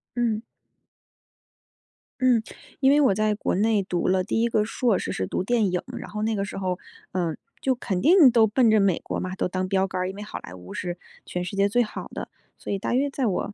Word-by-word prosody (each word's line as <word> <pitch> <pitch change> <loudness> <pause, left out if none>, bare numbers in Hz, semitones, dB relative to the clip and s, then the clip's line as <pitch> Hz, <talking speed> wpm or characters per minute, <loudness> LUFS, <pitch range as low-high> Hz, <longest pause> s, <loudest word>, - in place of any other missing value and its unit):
嗯。 230 -3 0 1.8
嗯， 250 -3 +4 0.4
因 265 - +4
为 290 - +5
我 270 -9 +4
在 215 +1 +1
国 - - -1
内 210 +1 +2
读 180 -2 -1
了 185 0 +2
第 215 +4 0
1 235 - +3
个 215 -2 +1
硕 225 -2 +1
士， - - -3
是 95 - -2
读 - - -2
电 220 -2 +1
影， 180 - 0 0.2
然 - - -8
后 210 0 -4
那 220 0 0
个 195 - -1
时 200 - -6
候， 185 -2 -2 0.3
嗯， 170 -4 -1 0.2
就 260 -1 +1
肯 190 -6 -2
定 320 -3 +7
都 225 -2 +5
奔 225 +1 +3
着 215 - +5
美 195 -4 +3
国 - - -4
嘛， 185 0 -4
都 - - 0
当 185 +1 -2
标 190 0 +2
杆 185 - -4
儿， 185 - -1
因 190 - -7
为 205 - -7
好 210 - -6
莱 90 - -10
坞 90 0 -10
是 175 -1 -4 0.3
全 180 - -3
世 185 - -5
界 200 +1 +3
最 245 +4 +3
好 215 - -7
的， - - -6 0.3
所 - - -5
以 195 - -1
大 225 - -2
约 275 +3 +2
在 270 -3 -1
我 200 +1 -2
205 Hz, 255 characters per minute, -25 LUFS, 185-235 Hz, 1.8 s, 定